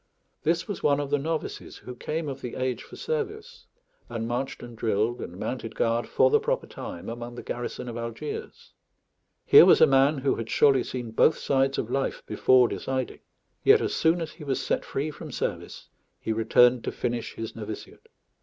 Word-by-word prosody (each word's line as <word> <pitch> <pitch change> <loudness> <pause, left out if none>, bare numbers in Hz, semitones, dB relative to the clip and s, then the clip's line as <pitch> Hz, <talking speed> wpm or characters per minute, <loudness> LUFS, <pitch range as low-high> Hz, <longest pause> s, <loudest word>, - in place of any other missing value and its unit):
This 165 +1 0
was 205 - -5
one 145 -1 +3
of 145 -1 -4
the 145 - +2
novices, 160 +2 -4
who 125 - -9
came 155 +5 -4
of 135 - -5
the 125 - -6
age 130 -1 -2
for - - -12
service, 450 0 -4 0.4
and 115 0 -3
marched 125 +3 -3
and 120 -1 -9
drilled 110 +1 0
and 90 - -7
mounted 115 +1 -4
guard 115 +1 0
for 130 - +3
the - - +5
proper - - -1
time 85 - -8
among 120 +1 -6
the - - -8
garrison 120 0 -5
of 120 - -5
Algiers. 115 +5 -6 0.7
Here - - +9
was - - +6
a - - +9
man 135 +2 +4
who 135 +1 0
had 115 -1 -5
surely 135 -3 +4
seen 120 -3 -5
both 155 - +4
sides 135 0 +1
of 115 - -3
life 135 0 -1
before 125 -1 +4
deciding; 130 0 -3 0.4
yet - - +7
as - - -2
soon 165 +2 +2
as 160 - -4
he 160 - -12
was 135 -3 -1
set - - -1
free 150 +3 -3
from - - -9
service - - -4 0.3
he 110 - -2
returned 120 +2 +4
to - - -1
finish 120 -1 -3
his 115 -1 -6
novitiate. 110 -1 -8
130 Hz, 190 wpm, -26 LUFS, 115-145 Hz, 0.7 s, Here